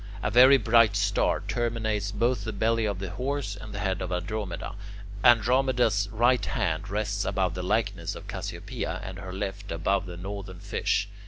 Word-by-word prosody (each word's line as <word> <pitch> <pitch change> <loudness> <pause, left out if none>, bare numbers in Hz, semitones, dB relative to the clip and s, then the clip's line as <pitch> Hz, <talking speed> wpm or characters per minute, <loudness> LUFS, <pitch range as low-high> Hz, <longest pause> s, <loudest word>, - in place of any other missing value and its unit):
A - - 0
very 130 +3 +8
bright 115 -3 +4
star - - +1
terminates 110 -4 -1
both 115 0 0
the 110 - -3
belly 115 +1 +1
of 100 -3 -1
the 95 -1 -5
Horse 130 -1 -3
and 105 +1 -9
the 100 - -6
head 95 -2 -1
of 90 0 -4
Andromeda. 90 +2 -3 0.5
Andromeda's 120 -3 +4
right 120 +1 +3
hand - - -1
rests 100 0 -1
above 95 -3 0
the 90 - -4
likeness 95 -3 -1
of - - -10
Cassiopea, - - -5
and 95 0 -7
her 95 -2 -7
left 100 +1 -5
above 95 +4 0
the 90 -1 -7
Northern 95 0 -7
Fish. 100 +2 0
105 Hz, 170 wpm, -27 LUFS, 95-115 Hz, 0.5 s, very